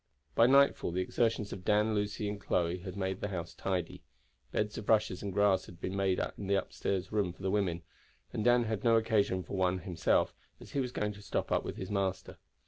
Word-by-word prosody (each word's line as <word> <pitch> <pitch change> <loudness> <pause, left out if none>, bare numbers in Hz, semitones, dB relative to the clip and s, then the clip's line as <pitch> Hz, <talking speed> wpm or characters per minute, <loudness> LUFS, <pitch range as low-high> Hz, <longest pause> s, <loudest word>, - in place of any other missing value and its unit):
By 115 - +6
nightfall 140 -4 +4
the 90 +2 -1
exertions 110 +2 0
of 95 - -8
Dan, 105 +2 +3
Lucy, 105 0 -1
and 100 0 -4
Chloe 90 -2 0
had 90 +1 -7
made 95 -1 -2
the - - -1
house 85 -4 -5
tidy. 90 -3 -3 0.5
Beds 105 0 -1
of 105 - -8
rushes 105 -4 +3
and 100 - -3
grass 100 0 +3
had 85 - -13
been 95 +2 -3
made 95 -1 +1
in 100 - -3
the 100 - +2
room - - +4
upstairs 95 -2 -2
for 100 -5 0
the 95 0 -2
women, 90 -5 0 0.5
and 110 - -1
Dan 120 +1 +5
had 110 -2 -3
no 115 -1 +5
occasion 105 -4 +1
for 90 - -6
one 95 -1 +2
for - - -9
himself, 90 -4 +1 0.3
as - - -12
he 140 - -1
was 125 -2 -1
going 105 -3 -1
to 100 - -12
stop - - -2
up - - +2
with - - -5
his 95 +1 -5
master. 95 -2 -2
100 Hz, 225 wpm, -32 LUFS, 95-105 Hz, 0.5 s, By